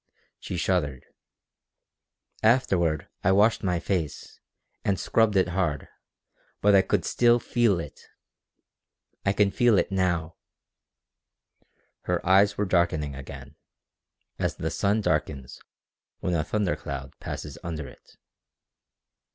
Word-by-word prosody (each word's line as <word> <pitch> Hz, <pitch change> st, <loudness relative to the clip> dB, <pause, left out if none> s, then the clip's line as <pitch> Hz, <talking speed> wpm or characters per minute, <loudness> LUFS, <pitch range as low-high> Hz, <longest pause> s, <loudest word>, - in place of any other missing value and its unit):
She 90 Hz, -, -5 dB
shuddered. 75 Hz, -8 st, -1 dB, 1.4 s
"Afterward 90 Hz, -, +2 dB, 0.2 s
I 95 Hz, -, +4 dB
washed 105 Hz, +4 st, +4 dB
my 90 Hz, -3 st, 0 dB
face, 85 Hz, -4 st, -3 dB, 0.4 s
and 100 Hz, -2 st, 0 dB
scrubbed 110 Hz, -2 st, +2 dB
it 95 Hz, -2 st, +3 dB
hard, 85 Hz, -5 st, -1 dB, 0.7 s
but 105 Hz, 0 st, +4 dB
I 100 Hz, -, +7 dB
could -, -, 0 dB
still 120 Hz, 0 st, +3 dB
feel 115 Hz, -7 st, +1 dB
it. 75 Hz, -4 st, -8 dB, 1.3 s
I -, -, +5 dB
can 100 Hz, 0 st, +2 dB
feel 120 Hz, 0 st, +3 dB
it -, -, +1 dB
now!" 85 Hz, -4 st, -1 dB, 1.7 s
Her 90 Hz, -1 st, -1 dB
eyes 100 Hz, +2 st, +4 dB
were 105 Hz, -, 0 dB
darkening 85 Hz, -6 st, +1 dB
again, 65 Hz, +1 st, -10 dB, 0.8 s
as -, -, -1 dB
the -, -, -3 dB
sun 100 Hz, +2 st, +1 dB
darkens 65 Hz, -9 st, -2 dB, 0.6 s
when 90 Hz, -, -2 dB
a 80 Hz, -2 st, +1 dB
thunder 100 Hz, +2 st, -1 dB
cloud -, -, -7 dB
passes -, -, -7 dB
under 80 Hz, -4 st, -5 dB
it. -, -, -17 dB
95 Hz, 120 wpm, -26 LUFS, 80-100 Hz, 1.7 s, I